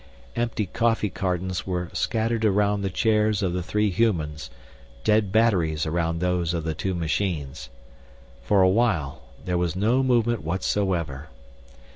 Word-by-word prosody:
Empty 115 Hz, -3 st, -1 dB
coffee 115 Hz, 0 st, 0 dB
cartons 90 Hz, 0 st, -2 dB
were 90 Hz, -2 st, -3 dB
scattered 115 Hz, 0 st, 0 dB
around 105 Hz, -1 st, +2 dB
the 100 Hz, -, -1 dB
chairs 105 Hz, +1 st, +1 dB
of 90 Hz, -2 st, 0 dB
the 90 Hz, -, -1 dB
three 105 Hz, +3 st, 0 dB
humans, 80 Hz, -, 0 dB, 0.5 s
dead 105 Hz, -2 st, +2 dB
batteries 90 Hz, -9 st, +2 dB
around 85 Hz, +1 st, -1 dB
those 90 Hz, -1 st, 0 dB
of 85 Hz, -, -2 dB
the 80 Hz, 0 st, -2 dB
two 95 Hz, +3 st, -3 dB
machines. 80 Hz, -6 st, -2 dB, 0.7 s
For 95 Hz, +10 st, +3 dB
a -, -, +6 dB
while, 95 Hz, -, +1 dB, 0.2 s
there 90 Hz, -1 st, 0 dB
was 90 Hz, -2 st, -1 dB
no 115 Hz, +7 st, +2 dB
movement 120 Hz, -3 st, +1 dB
whatsoever. 85 Hz, -4 st, -1 dB
95 Hz, 140 wpm, -25 LUFS, 85-105 Hz, 0.7 s, a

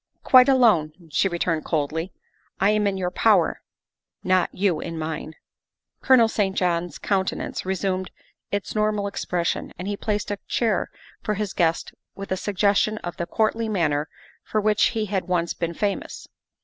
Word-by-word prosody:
" -, -, -48 dB
Quite 255 Hz, +1 st, +8 dB
alone," 220 Hz, -, +4 dB, 0.2 s
she 150 Hz, -, +2 dB
returned 170 Hz, -2 st, -1 dB
coldly. 160 Hz, +3 st, -2 dB, 0.3 s
" -, -, -39 dB
I 200 Hz, +2 st, +4 dB
am 210 Hz, -1 st, +2 dB
in 195 Hz, -1 st, -1 dB
your 180 Hz, -1 st, -2 dB
power 195 Hz, -3 st, +3 dB, 0.6 s
not 185 Hz, -1 st, +2 dB
you 185 Hz, -5 st, 0 dB
in 165 Hz, 0 st, -5 dB
mine." 155 Hz, 0 st, -5 dB, 0.7 s
Colonel 255 Hz, -4 st, +6 dB
St. 200 Hz, -3 st, -1 dB
John's 175 Hz, -3 st, 0 dB
countenance 190 Hz, -1 st, -2 dB
resumed 190 Hz, 0 st, -1 dB, 0.4 s
its 205 Hz, -1 st, -2 dB
normal 210 Hz, -1 st, 0 dB
expression, 180 Hz, -3 st, -2 dB
and 180 Hz, -, -6 dB
he 205 Hz, -, -1 dB
placed 205 Hz, 0 st, -2 dB
a 205 Hz, -, -3 dB
chair 220 Hz, -6 st, 0 dB, 0.3 s
for 210 Hz, -, -1 dB
his 205 Hz, -1 st, -3 dB
guest 165 Hz, -2 st, 0 dB, 0.2 s
with 195 Hz, -1 st, -8 dB
a -, -, +2 dB
suggestion 205 Hz, +2 st, +1 dB
of 175 Hz, -, -5 dB
the 170 Hz, -, -3 dB
courtly 225 Hz, +1 st, 0 dB
manner 155 Hz, -7 st, 0 dB, 0.3 s
for 215 Hz, -, -1 dB
which 210 Hz, 0 st, +3 dB
he 215 Hz, -, 0 dB
had 195 Hz, -2 st, -2 dB
once 175 Hz, -2 st, 0 dB
been 170 Hz, -1 st, -3 dB
famous. 205 Hz, +1 st, -3 dB
190 Hz, 165 wpm, -24 LUFS, 170-210 Hz, 0.7 s, Quite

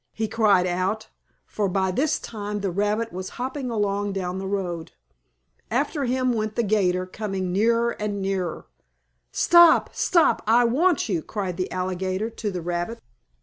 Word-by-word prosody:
he 220 Hz, 0 st, -2 dB
cried 210 Hz, -4 st, +3 dB
out, 185 Hz, +5 st, -1 dB, 0.4 s
for 205 Hz, -2 st, -2 dB
by 190 Hz, 0 st, 0 dB
this 300 Hz, +10 st, +1 dB
time 210 Hz, -2 st, -5 dB
the 195 Hz, -2 st, -1 dB
rabbit 210 Hz, +4 st, -1 dB
was 185 Hz, +1 st, -5 dB
hopping 260 Hz, +1 st, -3 dB
along 205 Hz, -2 st, -1 dB
down 185 Hz, -1 st, -3 dB
the 190 Hz, -, -4 dB
road. 180 Hz, -4 st, -3 dB, 0.8 s
After 280 Hz, +4 st, 0 dB
him 255 Hz, 0 st, +1 dB
went 215 Hz, -1 st, -2 dB
the 235 Hz, -, +1 dB
'gator, 185 Hz, -4 st, +1 dB
coming 190 Hz, -1 st, -4 dB
nearer 230 Hz, +4 st, +2 dB
and 210 Hz, -2 st, -3 dB
nearer. 190 Hz, -3 st, -2 dB, 0.7 s
"Stop! 345 Hz, -2 st, +6 dB
Stop! 345 Hz, -4 st, +3 dB
I 235 Hz, +2 st, +5 dB
want 310 Hz, +8 st, +2 dB
you!" 180 Hz, -7 st, -1 dB
cried 190 Hz, -1 st, -4 dB
the 185 Hz, -, -3 dB
alligator 185 Hz, +3 st, -2 dB
to 220 Hz, -1 st, -4 dB
the 180 Hz, -4 st, -5 dB
rabbit. 175 Hz, +6 st, -3 dB
205 Hz, 155 wpm, -24 LUFS, 185-230 Hz, 0.8 s, Stop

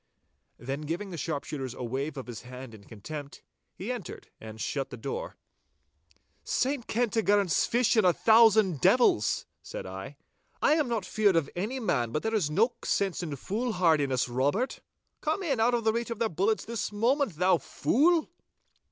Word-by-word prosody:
Then 135 Hz, +4 st, -5 dB
giving 170 Hz, +6 st, -4 dB
the -, -, -5 dB
sharpshooters 140 Hz, -5 st, -4 dB
a -, -, -6 dB
wave 135 Hz, +5 st, -3 dB
of 135 Hz, -, -5 dB
his 120 Hz, -2 st, -8 dB
hand 125 Hz, -1 st, -10 dB
in 100 Hz, -2 st, -14 dB
contempt, 140 Hz, +6 st, -8 dB, 0.3 s
he -, -, -4 dB
entered -, -, -7 dB
and 110 Hz, 0 st, -10 dB
shut 135 Hz, +4 st, -2 dB
the 125 Hz, -, -8 dB
door. -, -, -5 dB, 1.1 s
'Saint 265 Hz, -1 st, -1 dB
Kentigern's 205 Hz, -5 st, +2 dB
fish 240 Hz, 0 st, +2 dB
and 220 Hz, -, +4 dB
a -, -, +6 dB
thousand 220 Hz, -, +5 dB
devils,' 185 Hz, -, +3 dB, 0.2 s
said -, -, -7 dB
I, 95 Hz, +9 st, -8 dB, 0.4 s
'I -, -, +4 dB
am 305 Hz, -4 st, +2 dB
not 225 Hz, -5 st, -1 dB
feared 210 Hz, -4 st, +2 dB
of 165 Hz, -4 st, +1 dB
any 215 Hz, +9 st, -2 dB
man, 125 Hz, -, 0 dB
but 155 Hz, -, -2 dB
there 225 Hz, -, -1 dB
is 195 Hz, -9 st, +1 dB
no 220 Hz, +10 st, +2 dB
sense 195 Hz, -3 st, 0 dB
in 155 Hz, -5 st, -4 dB
foolhardiness, 165 Hz, -, +1 dB
Robert. 145 Hz, -, -1 dB, 0.4 s
Come 315 Hz, +6 st, -1 dB
in 275 Hz, -9 st, 0 dB
out 240 Hz, +2 st, +3 dB
of 230 Hz, -2 st, -2 dB
reach 230 Hz, +2 st, +1 dB
of 230 Hz, -, -4 dB
their 230 Hz, 0 st, 0 dB
bullets 195 Hz, +7 st, 0 dB
this 230 Hz, -2 st, -3 dB
moment, 235 Hz, -, +1 dB
thou 180 Hz, +1 st, +3 dB
fool! 320 Hz, +5 st, +2 dB
190 Hz, 170 wpm, -28 LUFS, 140-230 Hz, 1.1 s, a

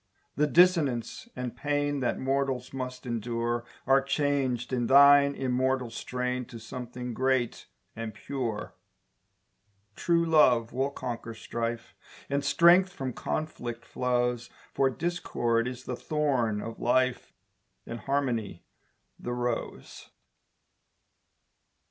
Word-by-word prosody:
The 150 Hz, +1 st, +2 dB
dissonance 160 Hz, -, +2 dB
and 125 Hz, -1 st, -4 dB
pain 145 Hz, -1 st, -1 dB
That 125 Hz, -, 0 dB
mortals 135 Hz, -1 st, -1 dB
must 130 Hz, -1 st, -5 dB
endure 120 Hz, 0 st, -2 dB, 0.2 s
Are 135 Hz, +1 st, +5 dB
changed 135 Hz, -3 st, 0 dB
in 120 Hz, -2 st, 0 dB
thine 140 Hz, +1 st, +7 dB
immortal 130 Hz, -1 st, 0 dB
strain 125 Hz, +2 st, -3 dB
To 115 Hz, -, -10 dB
something 125 Hz, +1 st, -6 dB
great 130 Hz, -1 st, 0 dB, 0.3 s
and 115 Hz, -1 st, -5 dB
pure. 115 Hz, 0 st, -4 dB, 1.2 s
True 170 Hz, -1 st, +2 dB
love 125 Hz, -8 st, +4 dB
will 135 Hz, +2 st, 0 dB
conquer 120 Hz, -4 st, -6 dB
strife, 115 Hz, +1 st, -4 dB, 0.4 s
And 140 Hz, 0 st, +1 dB
strength 180 Hz, +4 st, +5 dB
from 130 Hz, -7 st, -4 dB
conflict 120 Hz, -7 st, -4 dB
flows, 125 Hz, -1 st, -1 dB, 0.2 s
For 135 Hz, -1 st, +3 dB
discord 125 Hz, -7 st, -1 dB
is 125 Hz, 0 st, -6 dB
the 125 Hz, -, -4 dB
thorn 125 Hz, -8 st, 0 dB
of 115 Hz, 0 st, -7 dB
life 125 Hz, 0 st, +1 dB, 0.5 s
And 115 Hz, -, -6 dB
harmony 120 Hz, -9 st, -2 dB, 0.5 s
the 120 Hz, -, -4 dB
rose. 120 Hz, -1 st, -4 dB
125 Hz, 110 wpm, -28 LUFS, 120-140 Hz, 1.2 s, thine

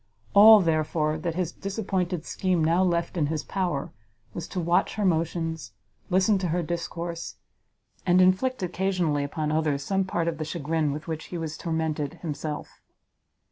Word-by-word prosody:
All, 215 Hz, +1 st, +9 dB
therefore, 155 Hz, -2 st, 0 dB
that 165 Hz, +1 st, -3 dB
his 180 Hz, -2 st, -1 dB
disappointed 190 Hz, -4 st, -3 dB
scheme 185 Hz, -4 st, 0 dB
now 170 Hz, +3 st, +3 dB
left 175 Hz, 0 st, 0 dB
in 150 Hz, -3 st, +2 dB
his 155 Hz, 0 st, -2 dB
power, 175 Hz, -8 st, -2 dB, 0.4 s
was 170 Hz, -, -5 dB
to 185 Hz, -, -4 dB
watch 175 Hz, +2 st, +1 dB
her 210 Hz, -, 0 dB
motions, 165 Hz, -, -1 dB, 0.4 s
listen 190 Hz, +2 st, +3 dB
to 185 Hz, -, -1 dB
her 175 Hz, +1 st, 0 dB
discourse, 170 Hz, 0 st, -4 dB, 0.7 s
and 180 Hz, 0 st, +4 dB
inflict 190 Hz, +6 st, +3 dB
occasionally 180 Hz, -5 st, 0 dB
upon 150 Hz, +1 st, -2 dB
others 155 Hz, -3 st, 0 dB
some 195 Hz, +4 st, +1 dB
part 170 Hz, -3 st, -1 dB
of 165 Hz, -2 st, -2 dB
the -, -, -1 dB
chagrin 155 Hz, -1 st, -1 dB
with 150 Hz, +3 st, -6 dB
which 160 Hz, -1 st, -4 dB
he 175 Hz, -, -6 dB
was 160 Hz, -1 st, -4 dB
tormented 160 Hz, -3 st, -2 dB
himself. 150 Hz, -1 st, -5 dB
170 Hz, 160 wpm, -26 LUFS, 155-185 Hz, 0.7 s, All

